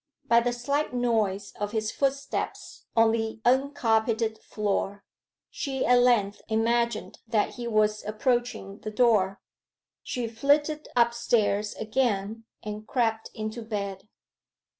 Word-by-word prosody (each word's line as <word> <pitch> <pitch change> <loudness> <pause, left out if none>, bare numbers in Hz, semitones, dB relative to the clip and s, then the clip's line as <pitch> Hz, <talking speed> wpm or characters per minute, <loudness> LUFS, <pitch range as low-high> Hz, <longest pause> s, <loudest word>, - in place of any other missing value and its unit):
By 235 0 +5
the 245 +1 0
slight 270 +3 -1
noise 215 -5 0
of 205 +1 -3
his 215 -1 -1
footsteps 275 0 -3
on 225 0 +6
the 225 0 -2
uncarpeted 230 -4 +2
floor, 205 -1 -2 0.5
she 265 -2 -2
at 245 0 +5
length 230 -5 +3
imagined 230 0 0
that 220 -2 +2
he 240 -1 -5
was 215 -1 +2
approaching 215 -2 -1
the 215 - -5
door. 210 -4 +3 0.6
She 245 -2 -3
flitted 290 +6 +1
upstairs 235 -3 +2
again 220 -2 -1 0.2
and 210 0 -6
crept 225 -3 0
into 215 +2 -4
bed. 205 -2 -5
225 Hz, 120 wpm, -27 LUFS, 210-245 Hz, 0.6 s, on